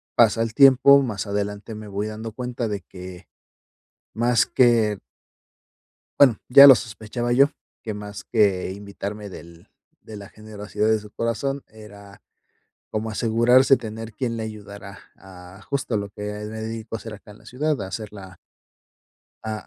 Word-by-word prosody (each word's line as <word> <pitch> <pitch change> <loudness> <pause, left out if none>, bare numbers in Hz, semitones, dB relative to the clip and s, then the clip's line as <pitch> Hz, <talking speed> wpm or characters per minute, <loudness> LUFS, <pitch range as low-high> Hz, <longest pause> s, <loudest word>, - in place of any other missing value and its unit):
pasa 115 -1 +4
el 115 -1 -2
tiempo 140 +1 +7
más 110 -7 -3
adelante 105 +2 -4
me 105 0 -9
voy 100 +1 -3
dando 110 +1 -7
cuenta 125 0 -4
de 100 -3 -4
que, 90 0 -11 0.9
más 120 0 +2
que 115 -5 +3 1.2
bueno, 130 -6 +6
ya 140 +2 +10
lo 135 - +10
sospechaba 115 +2 -4
yo, 140 +3 +5 0.3
que 110 -3 -5
más 105 -1 -8
que 100 -4 +1
invitarme 100 +1 -7
del 85 -2 -13 0.3
de 110 - -11
la 100 -1 -11
generosidad 105 0 -4
de 110 -1 +2
su 105 0 -14
corazón 135 +4 -3
era, 100 -2 -15 0.7
como 110 +1 -3
asegurarse 120 +4 +4
tener 110 -1 -8
quien 115 -2 -3
le 110 - -4
ayudara 100 -2 -9 0.2
a, 95 +1 -14
justo 130 -5 -1
lo 100 0 -4
que 105 - -12 0.3
me 110 0 -7
dedico 110 0 -6
a - - -2
hacer 110 +1 -9
acá 105 0 -13
en 105 - -16
la 110 - -22
ciudad, 145 +4 -2
a 95 - -5
hacer 105 +2 -6
la 95 -3 -12 1.1
a 110 - -4
110 Hz, 160 wpm, -23 LUFS, 100-115 Hz, 1.2 s, ya